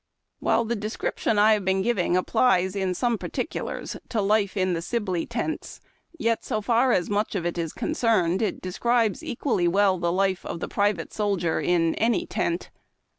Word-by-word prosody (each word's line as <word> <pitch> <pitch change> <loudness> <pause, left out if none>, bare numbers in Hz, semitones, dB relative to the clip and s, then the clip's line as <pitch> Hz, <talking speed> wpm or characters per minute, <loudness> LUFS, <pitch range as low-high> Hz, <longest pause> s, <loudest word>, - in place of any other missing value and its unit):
While 230 - +2
the 235 +2 -1
description 215 0 -2
I 215 +1 +6
have 210 -2 0
been 190 0 +1
giving 195 -6 +1
applies 185 -1 +2
in 190 -2 -1
some 240 -1 0
particulars - - -4
to 230 - -1
life 205 0 +1
in 185 -3 +1
Sibley 185 -4 -2
tents, 240 +7 -4 0.4
yet, 230 -6 0
so 215 - -1
far 240 +4 +2
as 180 -6 +1
much 205 +1 -1
of 175 -3 -2
it 175 - -1
is 165 -2 -2
concerned, 220 - +1
it 215 -4 -1
describes 225 +3 0
equally 230 -8 0
well 190 +1 +3
the 170 0 0
life 190 0 +1
of - - -5
the - - -4
private 200 -5 0
soldier 195 -6 0
in 165 -2 +2
any 225 -1 +1
tent. 170 +1 -2
200 Hz, 175 wpm, -25 LUFS, 180-225 Hz, 0.4 s, I